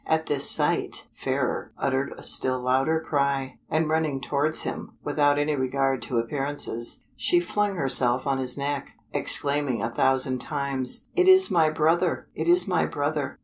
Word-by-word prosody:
At 160 Hz, 0 st, +1 dB
this 145 Hz, -1 st, +1 dB
sight -, -, +1 dB
Fairer -, -, -2 dB
uttered 135 Hz, 0 st, -1 dB
a -, -, -11 dB
still 130 Hz, 0 st, +1 dB
louder 135 Hz, +5 st, +1 dB
cry, 140 Hz, -3 st, -1 dB
and 155 Hz, +1 st, +1 dB
running 155 Hz, -3 st, 0 dB
towards 145 Hz, +3 st, -1 dB
him, -, -, -6 dB
without 145 Hz, -1 st, +2 dB
any 145 Hz, +1 st, +1 dB
regard 135 Hz, 0 st, 0 dB
to 125 Hz, -, -3 dB
appearances, 125 Hz, -1 st, -3 dB
she 125 Hz, +8 st, +2 dB
flung 200 Hz, +3 st, -1 dB
herself 130 Hz, -4 st, +2 dB
on 135 Hz, -1 st, 0 dB
his 130 Hz, 0 st, -3 dB
neck, 140 Hz, 0 st, -3 dB, 0.2 s
exclaiming 140 Hz, -6 st, +1 dB
a 115 Hz, -, -2 dB
thousand 130 Hz, 0 st, +2 dB
times, 140 Hz, -2 st, -2 dB
"It 365 Hz, 0 st, +3 dB
is 380 Hz, 0 st, +7 dB
my 165 Hz, -3 st, +4 dB
brother! 165 Hz, +3 st, +1 dB
it -, -, -4 dB
is 350 Hz, +1 st, +4 dB
my -, -, +1 dB
brother." -, -, -3 dB
140 Hz, 160 wpm, -25 LUFS, 130-155 Hz, 0.2 s, is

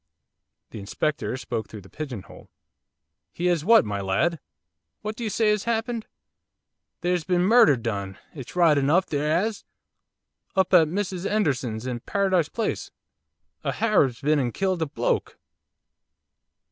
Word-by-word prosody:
The -, -, -7 dB
Inspector 130 Hz, +7 st, -2 dB
spoke 115 Hz, -3 st, -4 dB
through 105 Hz, -, -9 dB
the 95 Hz, -, -15 dB
pigeon 135 Hz, -10 st, -6 dB
hole. -, -, -15 dB, 0.8 s
'He 175 Hz, -, -4 dB
has 175 Hz, -4 st, +2 dB
what, 225 Hz, -, +6 dB
my 100 Hz, -1 st, -3 dB
lad? 125 Hz, -, 0 dB, 0.6 s
What 215 Hz, +1 st, -4 dB
do 235 Hz, -, -6 dB
you 220 Hz, -, -1 dB
say 215 Hz, +1 st, +2 dB
has 210 Hz, -1 st, -1 dB
happened?' 230 Hz, 0 st, -2 dB, 0.9 s
'There's 180 Hz, -1 st, 0 dB
been 180 Hz, +1 st, +1 dB
murder 225 Hz, -, +6 dB
done 100 Hz, -5 st, -4 dB, 0.2 s
it's 135 Hz, -1 st, -9 dB
right 165 Hz, -5 st, +4 dB
enough! 155 Hz, +7 st, +3 dB
there 150 Hz, +1 st, -1 dB
'as! 205 Hz, +6 st, 0 dB, 0.9 s
up 190 Hz, -1 st, +2 dB
at 165 Hz, -3 st, +7 dB
Mrs 190 Hz, +1 st, -3 dB
'Enderson's, 130 Hz, -, -1 dB
in 125 Hz, -2 st, -3 dB
Paradise 190 Hz, -, +1 dB
Place, 230 Hz, -, -3 dB, 0.7 s
a -, -, -1 dB
Harab's 150 Hz, -, +2 dB
been 150 Hz, +1 st, +2 dB
and 125 Hz, -3 st, -2 dB
killed 190 Hz, -3 st, 0 dB
a 160 Hz, -, 0 dB
bloke! -, -, -2 dB
165 Hz, 145 wpm, -25 LUFS, 130-200 Hz, 0.9 s, at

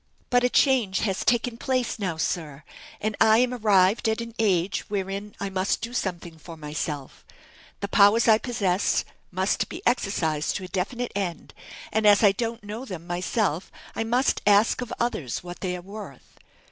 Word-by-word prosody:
"But 245 Hz, 0 st, +4 dB
a 250 Hz, -, +3 dB
change 245 Hz, -9 st, +3 dB
has 195 Hz, -3 st, -1 dB
taken 235 Hz, 0 st, +1 dB
place 255 Hz, -2 st, -1 dB
now, 185 Hz, -6 st, -2 dB
sir: 155 Hz, -3 st, -3 dB, 0.4 s
and 215 Hz, 0 st, -2 dB
I 220 Hz, 0 st, +6 dB
am 250 Hz, +1 st, +2 dB
arrived 210 Hz, -1 st, +3 dB
at 220 Hz, -, 0 dB
an 230 Hz, 0 st, -6 dB
age 190 Hz, -3 st, +2 dB
wherein 200 Hz, +1 st, -4 dB
I 200 Hz, -1 st, -3 dB
must 190 Hz, +1 st, 0 dB
do 235 Hz, +1 st, -6 dB
something 175 Hz, -7 st, -4 dB
for 165 Hz, +1 st, -10 dB
myself: 150 Hz, -2 st, -5 dB, 0.6 s
the 200 Hz, -, -2 dB
powers 205 Hz, +3 st, +5 dB
I 220 Hz, -1 st, +6 dB
possess 200 Hz, -7 st, 0 dB, 0.2 s
must 185 Hz, +2 st, 0 dB
be -, -, -8 dB
exercised 170 Hz, -10 st, 0 dB
to 195 Hz, -, -4 dB
a -, -, -6 dB
definite 235 Hz, +7 st, -2 dB
end, 190 Hz, -4 st, -4 dB, 0.4 s
and 220 Hz, -1 st, +2 dB
as 205 Hz, +1 st, +6 dB
I 205 Hz, -, +7 dB
don't 230 Hz, +2 st, -4 dB
know 210 Hz, +4 st, -6 dB
them 185 Hz, -9 st, -7 dB
myself 180 Hz, 0 st, -1 dB, 0.2 s
I -, -, -1 dB
must 245 Hz, +4 st, +1 dB
ask 205 Hz, +4 st, +4 dB
of 245 Hz, -, -5 dB
others 175 Hz, -, -2 dB
what 175 Hz, 0 st, -8 dB
they 180 Hz, -2 st, -2 dB
are -, -, -9 dB
worth. 195 Hz, -8 st, -11 dB
200 Hz, 175 wpm, -25 LUFS, 180-230 Hz, 0.6 s, I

